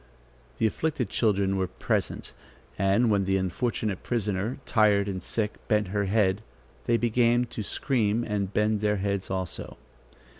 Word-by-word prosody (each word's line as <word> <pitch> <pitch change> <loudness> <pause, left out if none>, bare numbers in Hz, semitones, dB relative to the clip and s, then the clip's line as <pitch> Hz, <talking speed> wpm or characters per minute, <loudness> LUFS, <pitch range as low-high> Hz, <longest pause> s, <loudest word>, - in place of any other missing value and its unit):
The - - +1
afflicted 125 0 -1
children 100 -4 +1
were 95 -1 0
present, - - -2 0.4
and 100 +5 +3
when 100 -2 +2
the 95 0 +2
unfortunate 100 +1 -2
prisoner, 105 -1 -1
tired 105 -3 +3
and 95 -2 -3
sick, 110 -2 -2
bent 105 -3 +1
her 100 +1 0
head, 100 0 +2 0.5
they 115 - +4
began 120 +1 +2
to - - -4
scream 115 0 0
and 100 -4 -2
bent 105 0 +1
their 105 -1 +1
heads 100 -1 -2
also. 95 -3 -4
105 Hz, 145 wpm, -27 LUFS, 95-115 Hz, 0.5 s, they